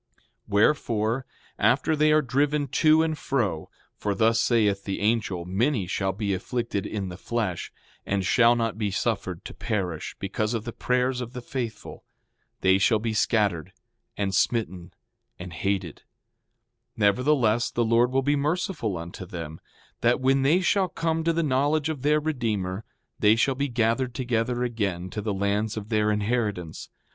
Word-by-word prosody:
6:11 -, -, -35 dB, 0.2 s
Wherefore, 115 Hz, +2 st, +1 dB, 0.3 s
after 140 Hz, +5 st, +3 dB
they 155 Hz, 0 st, +3 dB
are 155 Hz, 0 st, +4 dB
driven 140 Hz, +3 st, +1 dB
to 155 Hz, +3 st, +4 dB
and 160 Hz, -1 st, -1 dB
fro, 110 Hz, -, -2 dB, 0.3 s
for 100 Hz, -1 st, -2 dB
thus 115 Hz, +2 st, +3 dB
saith 105 Hz, -5 st, +2 dB
the 95 Hz, -, -3 dB
angel, 105 Hz, -5 st, 0 dB
many 105 Hz, +4 st, 0 dB
shall 95 Hz, +2 st, -1 dB
be 100 Hz, 0 st, -2 dB
afflicted 115 Hz, +1 st, -3 dB
in 100 Hz, -3 st, -4 dB
the 90 Hz, +1 st, -9 dB
flesh, 110 Hz, -8 st, -3 dB, 0.3 s
and 95 Hz, -1 st, -1 dB
shall 120 Hz, +4 st, +5 dB
not 115 Hz, -2 st, -2 dB
be 105 Hz, -2 st, 0 dB
suffered 100 Hz, -4 st, -2 dB
to -, -, -7 dB
perish, 95 Hz, -8 st, -3 dB
because 105 Hz, +3 st, -2 dB
of 110 Hz, -, -3 dB
the 120 Hz, -1 st, -6 dB
prayers 125 Hz, 0 st, 0 dB
of 120 Hz, 0 st, -6 dB
the 125 Hz, -, -5 dB
faithful; 120 Hz, -3 st, -6 dB, 0.6 s
they 95 Hz, +1 st, +4 dB
shall 110 Hz, +3 st, +4 dB
be 110 Hz, +1 st, -2 dB
scattered, 105 Hz, -7 st, +1 dB, 0.4 s
and 100 Hz, -1 st, -1 dB
smitten, 95 Hz, -3 st, 0 dB, 0.5 s
and 90 Hz, -1 st, -8 dB
hated; 95 Hz, 0 st, -2 dB, 1.0 s
nevertheless, 120 Hz, +2 st, +2 dB
the 120 Hz, -, 0 dB
Lord 115 Hz, +2 st, +3 dB
will 135 Hz, +1 st, +1 dB
be 145 Hz, +2 st, +2 dB
merciful 150 Hz, -, -1 dB
unto 85 Hz, +3 st, -7 dB
them, 85 Hz, -3 st, -7 dB, 0.4 s
that 120 Hz, +2 st, +2 dB
when 135 Hz, +1 st, +3 dB
they 155 Hz, +7 st, +3 dB
shall 190 Hz, +1 st, +2 dB
come 165 Hz, -2 st, -1 dB
to 165 Hz, -, +2 dB
the 165 Hz, 0 st, 0 dB
knowledge 145 Hz, +2 st, +1 dB
of 150 Hz, -5 st, -4 dB
their 150 Hz, +2 st, +3 dB
Redeemer, 110 Hz, -10 st, -2 dB, 0.4 s
they 105 Hz, +1 st, +5 dB
shall 135 Hz, +4 st, +2 dB
be 140 Hz, +2 st, -1 dB
gathered 120 Hz, 0 st, 0 dB
together 120 Hz, 0 st, -1 dB
again 100 Hz, -7 st, -2 dB
to 105 Hz, -, -4 dB
the 105 Hz, 0 st, -2 dB
lands 100 Hz, +2 st, -1 dB
of 105 Hz, 0 st, -6 dB
their 105 Hz, -2 st, +2 dB
inheritance. 105 Hz, -5 st, -2 dB
115 Hz, 165 wpm, -26 LUFS, 100-130 Hz, 1.0 s, shall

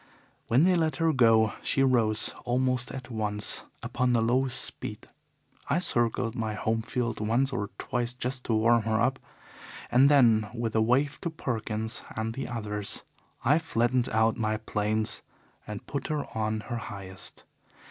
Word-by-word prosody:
When 125 Hz, +6 st, +4 dB
they 185 Hz, +1 st, +5 dB
let 160 Hz, -3 st, +1 dB
her 165 Hz, -2 st, +2 dB
go 115 Hz, -4 st, +4 dB
she 135 Hz, -, +1 dB
rose 115 Hz, -5 st, +3 dB
almost 125 Hz, 0 st, 0 dB
at 130 Hz, -1 st, -8 dB
once 105 Hz, -2 st, +1 dB, 0.2 s
upon 125 Hz, 0 st, 0 dB
the 115 Hz, -, +3 dB
lowest 130 Hz, +2 st, +1 dB
speed. -, -, -4 dB, 0.6 s
I -, -, +2 dB
circled 120 Hz, -8 st, +1 dB
my 110 Hz, -3 st, -3 dB
home 110 Hz, +1 st, 0 dB
field 120 Hz, 0 st, -2 dB
once 120 Hz, +6 st, +1 dB
or 105 Hz, -4 st, -2 dB
twice 120 Hz, 0 st, -2 dB
just 125 Hz, +1 st, -2 dB
to 115 Hz, -, +1 dB
warm 115 Hz, +2 st, +4 dB
her 110 Hz, 0 st, 0 dB
up, 130 Hz, +3 st, +1 dB, 0.7 s
and 130 Hz, +3 st, +6 dB
then 115 Hz, -7 st, +5 dB
with 115 Hz, -2 st, -2 dB
a 110 Hz, -, +4 dB
wave 130 Hz, +6 st, +1 dB
to 170 Hz, -, -2 dB
Perkins 110 Hz, -6 st, -3 dB
and 110 Hz, +1 st, -2 dB
the 135 Hz, -, -4 dB
others, 105 Hz, -4 st, -4 dB, 0.4 s
I 145 Hz, +6 st, +5 dB
flattened 125 Hz, -5 st, +1 dB
out 110 Hz, +1 st, +2 dB
my 110 Hz, -1 st, 0 dB
planes 110 Hz, 0 st, -1 dB, 0.5 s
and 105 Hz, -1 st, -7 dB
put 140 Hz, -, -4 dB
her 150 Hz, -2 st, -2 dB
on 110 Hz, 0 st, -1 dB
her 120 Hz, +1 st, -5 dB
highest. 95 Hz, -4 st, -6 dB
115 Hz, 160 wpm, -28 LUFS, 110-130 Hz, 0.7 s, and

